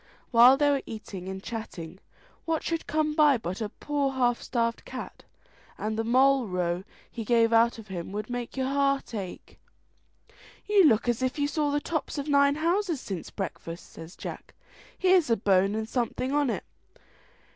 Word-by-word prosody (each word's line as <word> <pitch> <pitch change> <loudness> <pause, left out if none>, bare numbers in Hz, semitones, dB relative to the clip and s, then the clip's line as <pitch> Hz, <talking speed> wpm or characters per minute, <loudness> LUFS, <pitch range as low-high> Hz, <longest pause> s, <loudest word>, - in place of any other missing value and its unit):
While 245 +2 +8
they 290 0 +3
were 280 -1 +1
eating 195 -4 -7
and 190 0 -6
chatting, 190 -7 -7 0.5
what 325 -1 -1
should 330 -1 -2
come 305 0 0
by 300 -3 +5
but 190 -2 -5
a 215 - -2
poor 285 +3 -2
half 245 -2 +1
starved 230 -1 -1
cat, - - -8 0.5
and 215 +1 -2
the 225 - -1
moll 260 +1 +4
row 180 -1 -1 0.3
he 230 - -5
gave 230 0 +3
out 230 +1 +4
of 220 -3 -12
him 175 -1 -5
would 210 +1 -4
make 245 +1 -5
your 260 - 0
heart 275 -1 0
ache. 195 -5 -7 1.1
"You 410 -3 +5
look 230 -5 +4
as 240 0 +1
if 255 +2 -1
you 285 -1 +1
saw 300 -1 0
the 290 +1 +1
tops 315 0 -3
of 285 +1 -3
nine 280 -1 +4
houses 340 +1 0
since 190 -8 -6
breakfast," 170 -3 -6
says 165 +2 -11
Jack; - - -8 0.4
"here's 370 -5 +4
a 230 - +3
bone 195 0 +2
and 220 0 -2
something 250 +2 -2
on 290 -2 +2
it." - - -2
240 Hz, 180 wpm, -27 LUFS, 210-285 Hz, 1.1 s, While